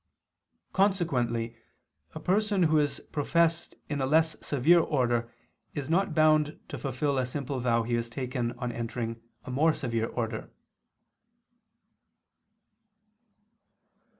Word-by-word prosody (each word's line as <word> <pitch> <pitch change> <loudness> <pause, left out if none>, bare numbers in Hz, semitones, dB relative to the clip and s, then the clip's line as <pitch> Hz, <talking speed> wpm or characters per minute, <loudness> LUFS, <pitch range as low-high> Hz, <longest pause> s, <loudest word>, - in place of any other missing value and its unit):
Consequently 130 - +1 0.6
a - - -4
person 200 +3 +2
who 155 -1 +4
is 145 -1 -1
professed 165 +3 +1
in 145 -2 -2
a 130 - +1
less 160 +2 +3
severe 150 +5 +4
order 120 -7 +1 0.4
is 145 0 -3
not 180 -1 +1
bound 155 -1 +3
to - - -5
fulfil 135 +1 -1
a 130 - +1
simple 140 0 -3
vow 120 -1 +2
he 120 +1 -3
has 115 0 -1
taken 125 -1 -2
on 125 -1 -4
entering 115 0 -4 0.2
a - - -6
more 155 +5 +3
severe 115 -3 -1
order. 115 -2 -4
140 Hz, 120 wpm, -29 LUFS, 120-160 Hz, 0.6 s, who